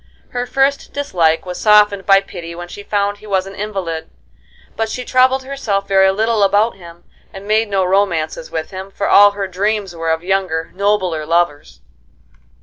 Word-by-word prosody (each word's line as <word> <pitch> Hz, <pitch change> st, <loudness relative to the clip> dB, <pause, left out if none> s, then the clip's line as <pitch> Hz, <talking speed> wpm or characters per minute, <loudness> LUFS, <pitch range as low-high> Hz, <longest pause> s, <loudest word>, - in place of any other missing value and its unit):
Her 245 Hz, 0 st, -3 dB
first 275 Hz, +2 st, 0 dB
dislike 170 Hz, -, 0 dB
was 180 Hz, -1 st, -6 dB
softened 210 Hz, -2 st, +4 dB
by 195 Hz, -1 st, +6 dB
pity 170 Hz, -3 st, -9 dB
when 175 Hz, +1 st, -8 dB
she 205 Hz, -, -9 dB
found 205 Hz, 0 st, -1 dB
he 215 Hz, -, -14 dB
was 190 Hz, -2 st, 0 dB
an 195 Hz, -, -9 dB
invalid, 195 Hz, -6 st, -5 dB, 0.7 s
but 225 Hz, 0 st, -2 dB
she 250 Hz, +2 st, -5 dB
troubled 260 Hz, +1 st, +3 dB
herself 230 Hz, -8 st, -3 dB
very 190 Hz, -1 st, +4 dB
little 220 Hz, +2 st, 0 dB
about 205 Hz, +3 st, +2 dB
him, 170 Hz, -2 st, -14 dB, 0.3 s
and 195 Hz, +1 st, -10 dB
made 215 Hz, +1 st, +2 dB
no 195 Hz, -2 st, +1 dB
romances 175 Hz, -5 st, 0 dB
with 160 Hz, -1 st, -5 dB
him, 190 Hz, +1 st, -7 dB
for 200 Hz, +1 st, -3 dB
all 205 Hz, 0 st, +6 dB
her 200 Hz, -1 st, -3 dB
dreams 195 Hz, 0 st, -2 dB
were 165 Hz, 0 st, -3 dB
of 160 Hz, +1 st, 0 dB
younger, 180 Hz, -4 st, -1 dB
nobler 190 Hz, -5 st, 0 dB
lovers. 150 Hz, -, -1 dB
195 Hz, 175 wpm, -17 LUFS, 175-210 Hz, 0.7 s, by